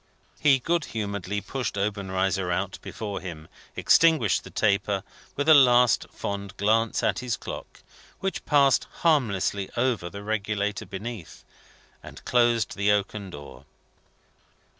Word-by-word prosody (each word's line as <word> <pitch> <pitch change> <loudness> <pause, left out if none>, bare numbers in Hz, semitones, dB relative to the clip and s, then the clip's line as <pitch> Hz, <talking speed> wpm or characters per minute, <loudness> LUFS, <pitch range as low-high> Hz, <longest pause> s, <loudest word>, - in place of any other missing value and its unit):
He 140 -3 +5
good 165 +5 -1
humouredly 100 -2 -3
pushed 125 -4 -4
Obenreizer 95 -2 -1
out 95 +2 -2
before 105 -3 -6
him; 80 -4 -8 0.3
extinguished 160 - +4
the - - -11
taper, 100 -1 0 0.3
with 145 +2 -2
a 160 - +9
last 125 -5 +5
fond 100 -1 -6
glance 110 +2 +1
at - - +1
his 125 -4 -2
clock - - -9 0.4
which 195 0 -3
passed 140 -3 +3 0.2
harmlessly 100 - +1
over 120 -8 0
the 100 +2 -9
regulator 105 -1 -2
beneath; 105 -2 -8 0.6
and - - -12
closed 120 -2 +2
the 100 +1 +2
oaken 100 -1 -1
door. 70 -5 -11
105 Hz, 125 wpm, -26 LUFS, 100-120 Hz, 0.6 s, a